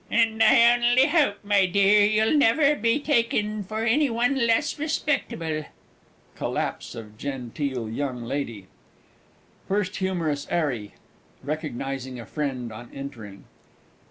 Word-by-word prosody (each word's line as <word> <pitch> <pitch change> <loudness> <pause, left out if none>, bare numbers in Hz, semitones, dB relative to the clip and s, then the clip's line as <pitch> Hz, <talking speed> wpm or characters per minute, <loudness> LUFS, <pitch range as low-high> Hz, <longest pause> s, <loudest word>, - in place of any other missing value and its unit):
And 225 -1 +2
I 235 +1 +7
only 240 +2 +4
hope, 295 -10 +2
my 200 -2 +3
dear, 200 +3 +4
you'll 215 +5 +3
never 285 +2 +4
be 230 +1 +1
taken 220 -7 0
for 220 +3 -3
any 275 +5 +3
one 240 +2 +1
less 230 +6 +1
respectable. 170 - -2 0.7
[Collapse - - -3
of 110 -2 -10
GENTEEL 130 -1 -4
Y.L. 130 +3 -3 1.2
FIRST 200 0 -1
HUMOROUS 170 -7 -2
'ARRY 130 -11 -2 0.5
(recognising 135 -3 -4
a 115 - -8
friend 130 -4 -4
on 120 +2 -10
entering). 115 -8 -9
190 Hz, 115 wpm, -25 LUFS, -, 1.2 s, I